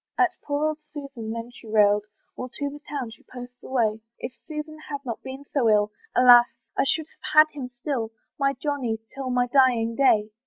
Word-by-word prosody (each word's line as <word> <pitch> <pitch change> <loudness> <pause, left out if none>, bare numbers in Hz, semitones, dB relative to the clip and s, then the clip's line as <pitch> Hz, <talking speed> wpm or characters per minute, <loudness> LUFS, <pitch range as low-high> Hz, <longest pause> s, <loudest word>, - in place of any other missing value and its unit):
At 365 -1 +3
poor 290 +1 -1
old 310 0 -1
Susan 280 -7 -8
then 230 +1 -5
she 235 - -14
railed, 210 -1 +4 0.3
While 255 - -6
to 285 +3 -3
the 290 +1 -10
town 270 -5 -3
she 220 - -14
posts 245 0 -11
away; 225 -4 0 0.2
"If 245 - -6
Susan 310 0 -6
had 285 -1 -5
not 235 -3 -4
been 265 +2 -8
so 250 -6 +3
ill, 210 0 +3 0.2
"Alas! 245 -1 +8 0.3
I - - +2
should 315 +2 +1
have - - -9
had 305 0 +8
him 270 -4 -6
still, 245 -6 -1 0.3
"My 275 0 +2
Johnny, 265 -5 -2 0.2
till 270 -1 -4
my 250 0 +2
dying 245 -3 +3
day." 220 -6 +3
255 Hz, 195 wpm, -25 LUFS, 230-285 Hz, 0.3 s, Alas